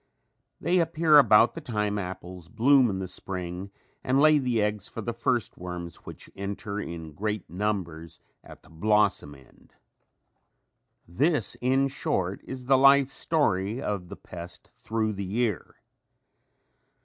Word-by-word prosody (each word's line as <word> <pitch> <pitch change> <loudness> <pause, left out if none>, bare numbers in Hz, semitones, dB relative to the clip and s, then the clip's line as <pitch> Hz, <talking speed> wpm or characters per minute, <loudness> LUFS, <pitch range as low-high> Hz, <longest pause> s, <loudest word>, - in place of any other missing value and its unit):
They 180 +1 +2
appear 160 -2 +5
about 115 -3 +5
the - - -7
time 105 -3 -2
apples 90 -2 -7
bloom 125 +3 +4
in 95 - -2
the 95 0 -4
spring 90 0 -6 0.3
and 130 +2 +2
lay 155 0 +6
the 125 -4 0
eggs 105 -1 -1
for - - -9
the 115 +2 -3
first 120 -1 -1
worms 90 -2 -7
which - - -10
enter 100 +1 -5
in 85 -5 -7
great 105 +4 -3
numbers 85 -3 -4 0.2
at - - -14
the - - -20
blossom 100 -4 +1
end. 65 -2 -21 1.3
This 130 - +1
in 135 +2 +2
short, 95 -8 -2
is 130 -1 -7
the 135 0 +4
life 140 0 +6
story 110 - 0
of 100 -8 -4
the - - -7
pest 85 -1 -10
through 110 -1 -2
the 100 0 -5
year. 105 -1 -2
105 Hz, 140 wpm, -27 LUFS, 90-125 Hz, 1.3 s, lay